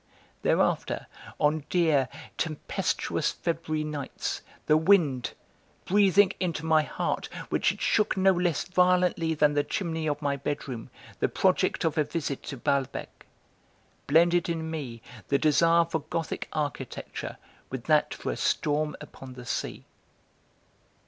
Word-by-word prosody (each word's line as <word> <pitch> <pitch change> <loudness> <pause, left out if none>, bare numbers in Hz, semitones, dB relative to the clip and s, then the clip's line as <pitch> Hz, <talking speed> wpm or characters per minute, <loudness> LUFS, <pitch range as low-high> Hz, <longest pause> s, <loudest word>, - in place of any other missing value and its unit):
Thereafter, - - +1 0.3
on 150 0 +2
dear, 155 -7 +3 0.3
tempestuous 155 -2 -1
February 160 -2 -2
nights, 150 -3 -4 0.2
the 155 - +5
wind 155 -7 +3 0.5
breathing 195 0 +5
into 170 -4 -2
my 160 -1 +5
heart, - - -2 0.2
which - - +2
it - - -10
shook 210 -2 +2
no 190 0 +5
less 175 -4 +1
violently 180 -3 +2
than 150 -1 +4
the 145 0 +2
chimney 160 -3 -2
of 145 -1 0
my 140 -2 0
bedroom, 135 -4 -4 0.3
the - - +2
project - - +2
of 160 0 +1
a - - +5
visit 150 -2 -3
to 140 - -5
Balbec 135 +2 -2 0.8
blended 170 +4 +4
in 160 -1 -2
me 125 -8 -5 0.2
the 140 - +3
desire 165 +3 +4
for 165 -1 -2
gothic 160 +2 -4
architecture 145 -4 -4 0.3
with 130 -2 -5
that 155 +1 +3
for - - -3
a - - -4
storm 150 0 0
upon 130 -1 -10
the 125 -1 -10
sea. - - -3
155 Hz, 135 wpm, -28 LUFS, 145-170 Hz, 0.8 s, the